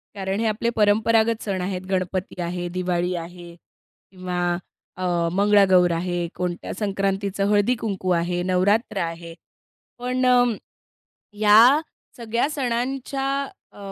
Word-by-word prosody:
कारण 195 +1 -3
हे 225 - 0
आपले 220 +2 0
परंपरागत 220 +2 +2
सण 195 -3 -2
आहेत, 185 0 -3
गणपती 185 -1 -2
आहे, 175 +1 -3
दिवाळी 180 0 -1
आहे 175 0 -8 0.6
किंवा 180 -1 -5 0.6
अ, - - -3 0.3
मंगळागौर 195 -2 +4
आहे, 175 0 -2
कोणत्या 180 -1 -4
संक्रांतीचं 195 0 -1
हळदी-कुंकू 205 -3 0
आहे, 175 +1 -2
नवरात्र 200 +5 +1
आहे 165 0 -5 0.7
पण 255 +1 -1
अ, 250 -1 +5 0.9
या 215 +7 +6 0.4
सगळ्या 235 +4 -1
सणांच्या 270 0 -2 0.5
अ - - -19
195 Hz, 110 wpm, -23 LUFS, 180-225 Hz, 0.9 s, या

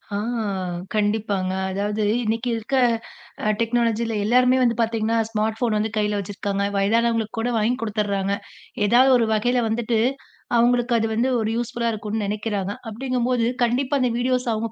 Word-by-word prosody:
ஆ, - - 0 0.8
கண்டிப்பாங்க. 205 -3 0 0.2
அதாவது 205 +2 -1 0.2
இன்னைக்கு 225 +3 -1
இருக்க, 225 +5 -3 0.7
அ - - +2
டெக்னாலஜில 230 -1 0
எல்லாருமே 250 +3 +4
வந்து 235 -1 +2
பாத்தீங்கன்னா, 225 0 0
ஸ்மார்ட் 220 0 -1
ஃபோன் 235 -4 +1
வந்து 215 +1 0
கைல 210 -1 +1
வச்சிருக்காங்க. 200 0 -2
வயதானவங்களுக்கு 225 +2 +1
கூட 240 +2 0
வாங்கி 220 +3 +1
கொடுத்தர்றாங்க. 200 -2 -1 0.5
ஏதாவது 255 +4 +5
ஒரு 230 - +1
வகைல 245 +3 +1
வந்துட்டு, 225 0 0 0.6
அவங்களுக்கு 240 +1 +3
அது 225 - 0
வந்து 240 +4 +1
ஒரு 220 -1 -1
யூஸ்புல்லா 235 0 -1
இருக்கும்னு 210 0 -3
நினைக்கிறாங்க. 205 -1 -2 0.2
அப்டிங்கம் 250 +1 -2
போது, 240 -2 +2 0.2
கண்டிப்பா 260 +4 +1
அந்த 250 -2 +1
வீடியோஸ் 250 0 0
அவுங்க 220 +1 -3
225 Hz, 145 wpm, -23 LUFS, 210-240 Hz, 0.8 s, ஏதாவது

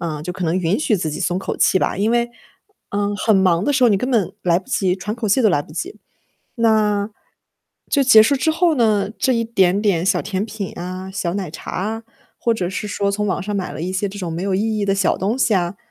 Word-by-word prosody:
嗯， 155 -4 -4
就 180 - -4
可 180 - -4
能 165 +1 0
允 185 +4 0
许 245 - +1
自 165 -3 -2
己 150 - -5
松 175 0 0
口 195 - -4
气 190 - +3
吧。 - - -1
因 210 +3 +1
为， 240 0 +1 0.6
嗯， 205 0 -1
很 215 0 +2
忙 185 -2 +3
的 290 - +1
时 260 -2 +4
候 235 - +5
你 200 - +3
根 255 - -2
本 225 -8 +1
来 175 -1 +3
不 190 - -16
及 185 -1 +1
喘 210 +3 -4
口 225 -3 -2
气 245 +6 +3
都 215 - +5
来 175 - +2
不 - - -18
及。 350 - -5 0.6
那 215 -3 +2 0.8
就 280 - +3
结 220 -4 +8
束 280 - +2
之 320 - +1
后 335 0 +2
呢， 215 -5 +2
这 260 - +2
一 230 -1 +1
点 195 -3 +2
点 185 -5 +1
小 - - +2
甜 195 +1 -3
品 210 -4 -6
啊、 185 +2 -6
小 175 -3 -2
奶 185 -6 -4
茶 - - -8
啊， 220 +5 -3 0.4
或 230 - +1
者 180 -5 -2
是 200 +2 -4
说 200 0 -1
从 210 +1 -1
网 190 - -1
上 210 - -4
买 190 -2 -3
了 - - -6
一 180 - -3
些 200 +2 -1
这 205 - -9
种 175 -4 -4
没 170 - -4
有 195 -1 0
意 215 +2 0
义 205 - 0
的 195 0 +1
小 195 -2 +1
东 210 +7 -1
西 235 -4 +2
啊， 175 0 -1
200 Hz, 280 characters per minute, -20 LUFS, 185-220 Hz, 0.8 s, 结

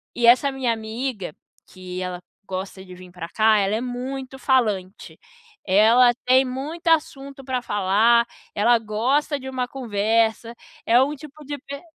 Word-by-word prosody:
e 235 -1 +2
essa 255 +3 +5
minha 260 -3 -1
amiga, 220 - -5 0.3
que 185 0 -8
ela 180 -1 -5 0.3
gosta 190 0 -6
de 185 - -12
vir 180 0 -13
para 170 -2 -7
cá, 215 +1 +3
ela 200 +2 0
é 230 - -2
muito 260 +2 -5
falante. 215 -8 -1 0.5
Ela 225 +5 +5
tem 260 +1 +4
muito 290 +7 -6
assunto 280 -4 -1
para 255 -2 -2
falar, 220 +3 +2 0.3
ela 235 +3 +4
gosta 255 +7 0
de 265 0 -7
uma 255 -1 -3
conversa, 225 -1 0 0.3
é 240 +2 +5
um 290 +3 0
tipo 300 +1 -13
de 290 0 -5
pe 280 +1 -9
240 Hz, 155 wpm, -22 LUFS, 205-265 Hz, 0.5 s, essa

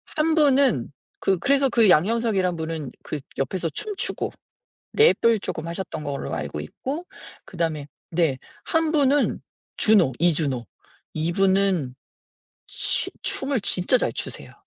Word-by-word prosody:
한 315 +1 +2
분은 275 - +3 0.3
그 190 -2 +1
그래서 275 +6 +3
그 235 -4 +4
양현석이란 195 +1 +2
분은 160 -4 -4
그 150 - -5 0.2
옆에서 165 +6 -1
춤추고 420 - -3 0.7
랩을 230 - +4
쪼끔 160 -3 -4
하셨던 170 -2 -4
걸로 140 -2 -4
알고 - - -4
있고 280 - -5 0.4
그다음에 160 -5 -3 0.2
네 160 -5 +1 0.3
한 325 -1 +1
분은 290 -2 +2 0.4
주노, 205 -10 +4
이주노. 150 -8 +1 0.5
이 160 +2 -1
분은 190 -7 +2 0.7
치 - - 0
춤을 270 -2 -1
진짜 185 +6 +2
잘 - - -1
추세요. - - -6
190 Hz, 245 characters per minute, -24 LUFS, -, 0.7 s, 그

